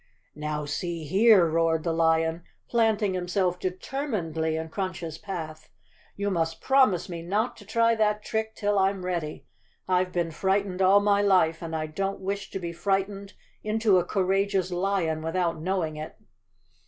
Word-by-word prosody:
"Now, 150 0 -3
see 165 +3 -3
here," 195 +4 +5
roared 165 0 +1
the 165 - 0
lion, 165 0 +2 0.3
planting 220 -4 +2
himself 180 0 0
determinedly 180 - -2
in 160 0 -4
Crunch's 175 -3 -4
path. 160 -5 -7 0.2
" - - -32
You 200 0 -1
must 165 -2 -1
promise 260 -10 +3
me 170 -2 -6
not 205 +8 -1
to 205 - -14
try 230 +1 +3
that 210 -1 +1
trick 220 0 -2
till 205 -1 +1
I'm 190 -1 +1
ready. 170 -4 -3 0.4
I've 185 0 +1
been 170 -2 -1
fright¬ 195 +4 +1
ened 185 -1 -5
all 195 +2 +6
my 205 0 +3
life 180 -5 +3
and 165 -1 -4
I 155 -1 -1
don't 195 +6 -3
wish 195 +1 -4
to - - -5
be 170 -2 -5
frightened 195 +2 -2 0.3
into 215 -3 +3
a - - 0
courageous 195 0 0
lion 175 -3 0
without 165 0 -1
knowing 170 -3 -1
it." 155 +1 -7
185 Hz, 165 wpm, -26 LUFS, 165-200 Hz, 0.4 s, all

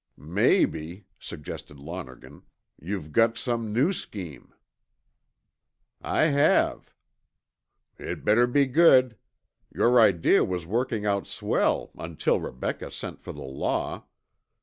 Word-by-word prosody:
"Maybe," 85 +5 0
suggested 75 -2 -9
Lonergan, 70 -3 -9 0.4
"you've 85 -2 -5
got 115 +6 +3
some 115 -3 -2
new 135 - +2
scheme." 90 - -8 1.5
"I - - +1
have." 145 +1 +2 1.1
"It - - -6
better 115 +4 +4
be 140 +3 +3
good. 130 -4 +5 0.6
Your 120 +1 +3
idea 95 -7 +4
was 90 -2 -3
working 115 +2 -2
out 100 -3 0
swell - - -1
until 80 -1 -1
Rebecca 65 - -5
sent - - -7
for - - -8
the - - -9
law. 65 0 -3
105 Hz, 105 wpm, -26 LUFS, 80-120 Hz, 1.5 s, good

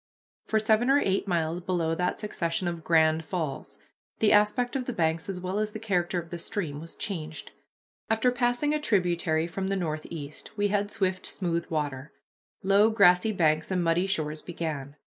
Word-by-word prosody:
For 220 - +1
seven 220 +3 +3
or 275 - +6
eight 195 -6 0
miles 170 -1 0
below 170 -3 0
that 180 +2 -1
succession 175 -4 -2
of 170 -2 -4
"Grand" 160 -1 +3
falls 160 -5 -4 0.4
the 215 - +3
aspect 210 +5 +3
of 260 -2 -1
the 250 - -3
banks 165 +1 0
as 185 -2 -3
well 185 +3 -2
as 215 0 -2
the - - -4
character 180 -5 0
of 170 -1 -9
the 175 - -4
stream 165 -5 -4
was 165 +1 -10
changed. 160 -6 -5 0.6
After 225 +3 +3
passing 245 +4 +1
a 305 - 0
tributary 175 - +1
from 190 +3 -4
the 195 - 0
northeast 155 -1 -5
we 205 0 +2
had 205 0 0
swift 185 -2 -1
smooth 170 -3 -2
water. 145 -3 -3 0.5
Low 200 +3 +5
grassy 200 -1 +5
banks 160 -5 +1
and 185 -2 0
muddy 170 +3 +2
shores 155 -4 -1
began. 150 -5 -5
180 Hz, 180 wpm, -27 LUFS, 160-210 Hz, 0.6 s, or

